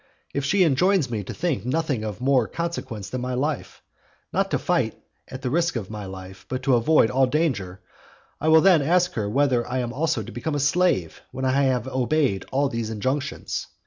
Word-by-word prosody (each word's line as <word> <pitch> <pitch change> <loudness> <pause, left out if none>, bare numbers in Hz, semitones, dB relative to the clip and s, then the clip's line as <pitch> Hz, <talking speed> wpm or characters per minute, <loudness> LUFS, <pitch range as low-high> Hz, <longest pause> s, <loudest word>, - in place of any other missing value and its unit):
If 140 - -1
she 190 +6 +3
enjoins 165 -1 +2
me 105 -3 -2
to - - -6
think 160 - -2
nothing 135 -2 -1
of 105 -2 -5
more 130 -3 +2
consequence 130 - -5
than 130 - -3
my 125 0 -2
life, 145 +1 -3 0.5
not - - +1
to - - +1
fight - - 0 0.3
at 130 0 -9
the 125 - -1
risk 170 +1 +1
of 110 -4 -4
my 105 -2 -6
life, 95 0 -10
but 130 0 -3
to 135 -1 +3
avoid 120 0 +4
all 130 0 +3
danger, 120 - -1 0.6
I 155 - -2
will 160 0 +7
then 185 -4 +6
ask 175 +5 +2
her 105 -3 -2
whether 130 0 +2
I 130 - -2
am 120 -2 -2
also 140 -4 0
to 110 - -9
become 145 +6 -3
a - - 0
slave 145 - +1
when 130 +1 -4
I 130 - +2
have 130 -3 +1
obeyed 130 -5 0
all 140 +2 +2
these 115 -3 -3
injunctions? 130 +6 -3
130 Hz, 205 wpm, -24 LUFS, 115-155 Hz, 0.6 s, will